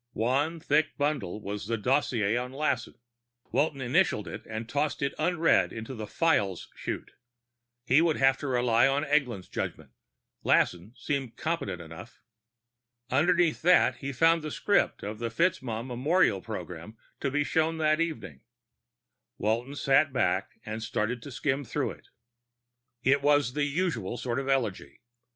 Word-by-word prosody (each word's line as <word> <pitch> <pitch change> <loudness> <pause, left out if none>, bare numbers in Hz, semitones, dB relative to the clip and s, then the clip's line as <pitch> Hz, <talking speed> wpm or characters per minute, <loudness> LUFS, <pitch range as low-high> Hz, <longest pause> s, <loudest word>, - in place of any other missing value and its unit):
One 140 +9 0
thick 150 0 +1
bundle 145 -10 -1
was 105 -1 -5
the 115 0 0
dossier 115 -3 +1
on 125 +1 -2
Lassen; 135 -4 -1 0.6
Walton 145 -2 +1
initialed 130 - +1
it - - -7
and 110 +1 -5
tossed 145 +4 -1
it 140 - 0
unread 175 -2 +3
into 115 +3 -6
the 110 -3 -6
Files 100 - 0
chute. - - -5 0.7
He 135 +6 +5
would 165 -2 +2
have 135 0 +4
to 145 - -4
rely 120 -2 +3
on 140 +2 +1
Eglin's 135 -10 0
judgement; - - -5 0.5
Lassen 90 +7 +1
seemed 135 -5 -3
competent 155 - -2
enough. 80 +8 -12 0.9
Underneath 170 +4 +3
that, 165 -8 +4
he 140 +2 -4
found 165 +5 +3
the 155 - -5
script 205 +7 +1
of 105 +1 -5
the 115 0 -2
FitzMaugham 120 -5 0
memorial 130 - +2
program 90 0 -7 0.2
to 140 - -1
be 145 +2 +1
shown 160 +2 0
that 155 0 +2
evening. 150 - -4 1.0
Walton 120 +6 -1
sat 140 +1 +3
back 125 -8 0
and 110 +1 -5
started 115 +2 -2
to 140 - -9
skim 140 +2 -1
through - - -2
it. - - -14 1.0
It 135 +2 +3
was 145 -3 +3
the 145 0 +1
usual 140 - -1
sort 120 +1 -2
of 135 - -4
eulogy. 110 - -1
130 Hz, 150 wpm, -28 LUFS, 110-150 Hz, 1.0 s, He